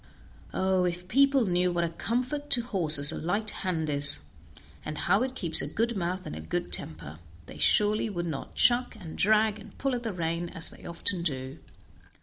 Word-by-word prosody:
Oh! 190 Hz, -1 st, +1 dB
if 180 Hz, 0 st, -3 dB
people 275 Hz, +3 st, +3 dB
knew 180 Hz, -1 st, +1 dB
what 175 Hz, 0 st, -1 dB
a 170 Hz, -, -1 dB
comfort 255 Hz, -, -3 dB
to 245 Hz, -4 st, +3 dB
horses 160 Hz, -, +2 dB
a -, -, -5 dB
light 205 Hz, +6 st, -1 dB
hand 170 Hz, -5 st, -2 dB
is, 145 Hz, -, +3 dB, 0.6 s
and 155 Hz, 0 st, -6 dB
how 195 Hz, +7 st, +2 dB
it 260 Hz, 0 st, -2 dB
keeps 165 Hz, -4 st, +7 dB
a -, -, +2 dB
good 230 Hz, +9 st, -1 dB
mouth 180 Hz, 0 st, -3 dB
and -, -, -6 dB
a -, -, -7 dB
good 80 Hz, -, -4 dB
temper, 80 Hz, 0 st, -4 dB, 0.3 s
they 75 Hz, -, -12 dB
surely 210 Hz, -, +3 dB
would 175 Hz, -4 st, -4 dB
not 155 Hz, -5 st, -6 dB
chuck, 245 Hz, 0 st, +3 dB
and 165 Hz, -5 st, -9 dB
drag, 215 Hz, +1 st, +3 dB
and 210 Hz, -1 st, -15 dB
pull 275 Hz, -1 st, -1 dB
at 245 Hz, -, -2 dB
the 230 Hz, -2 st, -4 dB
rein 170 Hz, -1 st, -3 dB
as 165 Hz, 0 st, +2 dB
they -, -, -13 dB
often 170 Hz, +2 st, -3 dB
do. 135 Hz, -5 st, -4 dB
180 Hz, 195 wpm, -27 LUFS, 160-220 Hz, 0.6 s, keeps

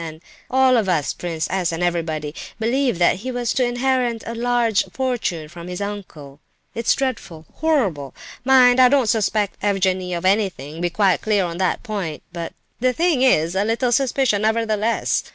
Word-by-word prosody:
And 160 Hz, -1 st, -8 dB, 0.3 s
I—all 260 Hz, 0 st, +4 dB
of 210 Hz, -4 st, 0 dB
us—Prince 165 Hz, 0 st, -1 dB
S. 185 Hz, -2 st, 0 dB
and 165 Hz, +1 st, -3 dB
everybody, 160 Hz, -4 st, -2 dB, 0.3 s
believed 245 Hz, 0 st, +1 dB
that 175 Hz, +1 st, +3 dB
he 255 Hz, +7 st, -5 dB
was 245 Hz, -1 st, -1 dB
to 260 Hz, -, +1 dB
inherit 245 Hz, -1 st, 0 dB
a 230 Hz, -, -5 dB
large 235 Hz, -2 st, +1 dB
fortune 240 Hz, -12 st, -2 dB
from 170 Hz, +2 st, -10 dB
this 180 Hz, 0 st, -5 dB
uncle. 185 Hz, -9 st, -7 dB, 0.3 s
It's 230 Hz, 0 st, +1 dB
dreadful, 195 Hz, -12 st, -4 dB
horrible! 205 Hz, -, 0 dB, 0.3 s
Mind, 255 Hz, -1 st, +5 dB
I 255 Hz, -1 st, +7 dB
don't 275 Hz, -2 st, +3 dB
suspect 215 Hz, -2 st, 0 dB
Evgenie 185 Hz, -2 st, 0 dB
of 170 Hz, -, -6 dB
anything, 185 Hz, -7 st, 0 dB
be 175 Hz, -, +1 dB
quite 190 Hz, 0 st, +2 dB
clear 205 Hz, -3 st, +1 dB
on 170 Hz, 0 st, -5 dB
that 185 Hz, -1 st, 0 dB
point; 200 Hz, -10 st, -4 dB
but 170 Hz, -1 st, -5 dB, 0.3 s
the 255 Hz, +1 st, +2 dB
thing 330 Hz, -3 st, +1 dB
is 170 Hz, -11 st, +3 dB
a 195 Hz, +1 st, +1 dB
little 230 Hz, +3 st, 0 dB
suspicious, 260 Hz, -3 st, +2 dB
nevertheless. 220 Hz, 0 st, 0 dB
210 Hz, 170 wpm, -21 LUFS, 175-245 Hz, 0.3 s, I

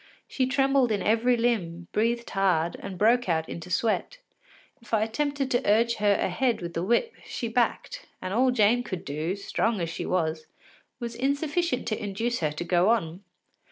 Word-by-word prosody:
She 260 Hz, -2 st, 0 dB
trembled 270 Hz, -2 st, +2 dB
in 200 Hz, -3 st, 0 dB
every 235 Hz, +3 st, +3 dB
limb, 180 Hz, -8 st, -1 dB
breathed 235 Hz, +2 st, 0 dB
hard, 180 Hz, -4 st, +1 dB
and 195 Hz, -2 st, -7 dB
broke 235 Hz, +2 st, +3 dB
out 160 Hz, -1 st, +1 dB
into 170 Hz, +1 st, -7 dB
sweat. 225 Hz, -, 0 dB, 0.6 s
If 230 Hz, -1 st, -2 dB
I 215 Hz, -, +2 dB
attempted 280 Hz, +4 st, -2 dB
to 245 Hz, -, +2 dB
urge 230 Hz, +3 st, +3 dB
her 205 Hz, -1 st, +3 dB
ahead 245 Hz, +3 st, 0 dB
with 170 Hz, -1 st, -6 dB
the 165 Hz, -, -2 dB
whip, 240 Hz, -, +1 dB
she 235 Hz, -, -4 dB
backed, 250 Hz, -, -1 dB
and 185 Hz, -, -4 dB
all 255 Hz, +4 st, +3 dB
Jane 240 Hz, 0 st, +3 dB
could 185 Hz, -7 st, -6 dB
do, 155 Hz, +6 st, -2 dB
strong 210 Hz, +2 st, -1 dB
as 165 Hz, -1 st, -2 dB
she -, -, -5 dB
was, 160 Hz, -3 st, -1 dB, 0.5 s
was 235 Hz, -2 st, -4 dB
insufficient 280 Hz, +3 st, -1 dB
to 215 Hz, -, -3 dB
induce 225 Hz, +4 st, -2 dB
her 155 Hz, -2 st, 0 dB
to 150 Hz, +3 st, -5 dB
go 175 Hz, +3 st, +2 dB
on. 180 Hz, -6 st, 0 dB
220 Hz, 180 wpm, -27 LUFS, 180-245 Hz, 0.6 s, every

